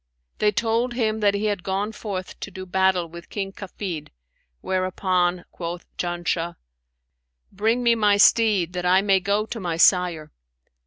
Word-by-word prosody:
They 210 - +3
told 230 +3 0
him 220 -3 0
that 205 -1 +3
he 205 +1 -1
had 205 -3 -1
gone 195 +3 -2
forth 200 -4 -6
to - - -6
do 190 -1 -8
battle 190 -1 +2
with 170 +1 -12
King 195 -2 -4
Kafid, 185 -5 -6 0.5
whereupon 185 -1 0
quoth 170 0 -6
Janshah, 175 -1 -2 1.0
'Bring 225 +5 0
me 235 -1 +5
my 210 -3 +3
steed, 205 -5 +4
that 180 -1 -3
I 185 +2 +4
may 195 -2 +4
go 200 +3 0
to 225 +1 -6
my 175 -4 -3
sire.' 170 -4 +3
190 Hz, 155 wpm, -23 LUFS, 180-210 Hz, 1.0 s, me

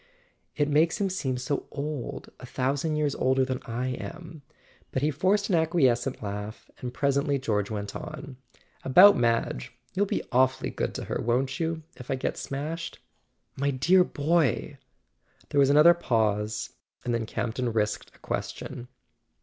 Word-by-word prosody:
" - - -44
It 145 -1 +1
makes 155 +3 +3
him 195 -2 0
seem 130 -9 -2
so 125 +3 -2
old—a 140 -3 -6
thou¬ 130 +2 0
sand 155 +2 -1
years 150 -2 +1
older 130 0 +2
than 130 -1 -2
I 125 +2 -2
am." 165 +4 -7 0.5
But 130 - -1
he 155 - +3
forced 195 +8 +1
an - - +4
acquies¬ 155 -7 +3
cent 120 0 -5
laugh, 105 +2 -6
and 125 - -5
presently 140 +2 +1
George 105 -6 -1
went 105 -2 -4
on: 140 -3 -7 0.5
"About 185 +10 +8
Madge—you'll 120 - -1
be - - -1
awfully 130 +1 +2
good - - -3
to - - -4
her, - - -3
won't 130 +6 0
you, 165 -1 -2
if 125 - -11
I - - +1
get 130 - -2
smashed?" 155 +5 -5 0.6
"My 140 +1 0
dear 150 +8 +4
boy!" 155 -4 0 0.7
There 145 - +1
was 140 -1 +5
another 150 +4 +8
pause, 110 -8 0 0.3
and 120 - 0
then 115 -2 -1
Campton 120 +2 -2
risked 105 -1 -1
a - - -19
question. 125 - -5
135 Hz, 160 wpm, -27 LUFS, 120-155 Hz, 0.7 s, About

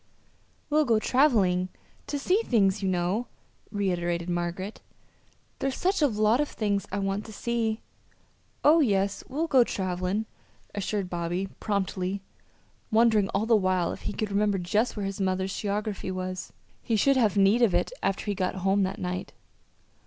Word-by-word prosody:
"We'll 305 0 +4
go 230 -4 +3
traveling 215 -8 +3 0.4
to 290 - -2
see 365 +9 +2
things, 200 - +2
you 190 - 0
know," 185 +6 0 0.4
reiterated 175 -4 -1
Margaret. 175 +4 -3 0.8
"There's 270 -1 -1
such 380 -1 +1
a 295 - +6
lot 215 +2 +2
of 295 - -1
things 205 -2 -1
I 195 - -2
want 195 +1 -1
to 220 - -9
see." 225 0 -1 0.8
"Oh, 315 +3 +6
yes, 200 -7 +1
we'll 300 +5 -1
go 265 -6 +5
travelin'," 185 +1 -2 0.5
assured 205 -1 -2
Bobby, 175 +2 -2
promptly, 195 -1 -2 0.7
wondering 220 -3 +4
all 200 +3 0
the 225 0 +4
while 185 -4 +1
if - - -7
he - - -4
could 215 -1 -3
remember 205 0 +2
just 210 +7 0
where 205 - -2
his 195 +1 -4
mother's 190 0 0
geography 205 -1 -2
was. 185 0 -4 0.3
He 230 - 0
should 275 +6 +4
have 215 -6 +2
need 200 +4 +4
of 225 -6 +4
it - - +1
after 195 - -1
he 205 - 0
got 185 -1 -1
home 195 +1 +3
that 190 0 -1
night. 180 +1 -4
200 Hz, 160 wpm, -27 LUFS, 185-225 Hz, 0.8 s, a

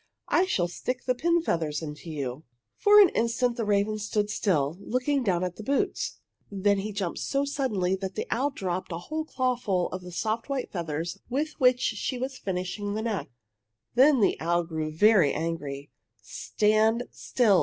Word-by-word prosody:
I 365 +2 +3
shall 180 - +1
stick 245 +7 -4
the 255 - +2
pin 340 +6 +1
feathers 160 - -1
into 150 +2 -7
you!" 140 -2 -4 0.3
For 415 0 +6
an 395 -4 +8
instant 235 0 0
the 230 -2 -2
raven 205 +1 +1
stood 210 0 -1
still, 155 -9 +1
looking 255 +6 0
down 185 -5 +1
at 180 -1 -3
the 215 - -7
boots. 275 +5 -1 0.3
Then 200 0 +2
he 210 +2 -3
jumped 195 -4 -3
so 275 0 0
suddenly 215 -10 0
that 190 0 -5
the - - -2
owl 275 +4 +1
dropped 185 -7 -4
a 165 - -2
whole 310 - -4
clawful 245 - 0
of 185 - -5
the 180 0 -9
soft 220 +7 -2
white 275 -2 -2
feathers 170 +1 -3
with 295 +5 -1
which 250 -1 +4
she 225 +4 -1
was 260 +2 -3
finishing 190 +2 -3
the 220 - -2
neck. 205 -10 -2 0.6
Then 265 0 +5
the - - +2
owl 170 +1 +1
grew 160 -2 -3
very 185 -2 +5
angry. 150 -4 -4 0.3
"Stand 220 +2 +1
still!" 215 -7 +2
205 Hz, 175 wpm, -27 LUFS, 175-250 Hz, 0.6 s, an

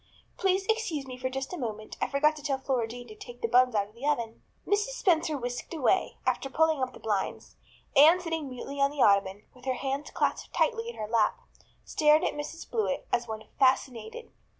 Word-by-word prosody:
Please 385 0 +1
excuse 435 -11 -1
me 255 -1 -7
for 255 +1 -3
just 270 +5 -4
a 360 - -4
moment. 215 -4 -5
I - - +2
forgot 300 +2 +2
to - - -9
tell 280 -2 -1
Flora 260 -3 -1
Jane 245 +2 -9
to - - -9
take 245 +2 -11
the - - +3
buns 250 0 +4
out 200 -1 +1
of - - -23
the 245 +5 -5
oven." 235 -6 -1 0.2
Mrs. 415 +5 0
Spencer 320 -4 +2
whisked 245 +5 -5
away, 315 +5 +1
after 270 - 0
pulling 315 0 +2
up 255 -1 -1
the - - -12
blinds. 205 -3 -3 0.4
Anne 315 +6 +8
sitting 325 -5 -3
mutely 275 +2 -6
on 275 - +5
the 285 -1 +1
ottoman, 200 0 +3
with 250 0 -17
her 260 -1 0
hands 275 +3 -3
clasped - - -2
tightly 460 -1 +1
in - - -8
her 215 - -5
lap, 220 -1 +2 0.5
stared 305 0 +4
at - - 0
Mrs 295 +3 -6
Blewett 435 -12 -1
as 235 0 +1
one 220 -1 -5 0.2
fascinated. 265 - +1
270 Hz, 210 wpm, -29 LUFS, 240-320 Hz, 0.5 s, Anne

